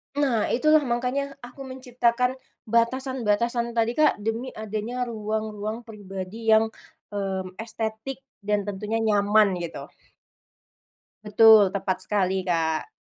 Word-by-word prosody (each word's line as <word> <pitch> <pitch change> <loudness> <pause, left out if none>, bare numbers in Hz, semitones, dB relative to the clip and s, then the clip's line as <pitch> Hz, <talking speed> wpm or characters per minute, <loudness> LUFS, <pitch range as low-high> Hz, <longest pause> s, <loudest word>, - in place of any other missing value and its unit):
Nah 260 -7 +1
itulah, 305 +3 +4
makanya 255 +4 -1
aku 250 +3 -11
menciptakan 250 0 0 0.3
batasan-batasan 235 -1 0
tadi, 230 0 +2
Kak, 305 - +5
demi 225 +3 -2
adanya 220 +3 -3
ruang-ruang 215 0 -4
pribadi 205 0 -8
yang, 220 0 +4 0.4
mmm, 190 -2 -3
estetik 225 +4 -5 0.2
dan 205 0 0
tentunya 210 +3 -3
nyaman 205 -2 +3
gitu. 170 -1 -6 1.4
Betul, 210 -2 +7
tepat 190 -1 -1
sekali, 190 -2 0
Kak. 160 -3 0
220 Hz, 105 wpm, -25 LUFS, 205-245 Hz, 1.4 s, Betul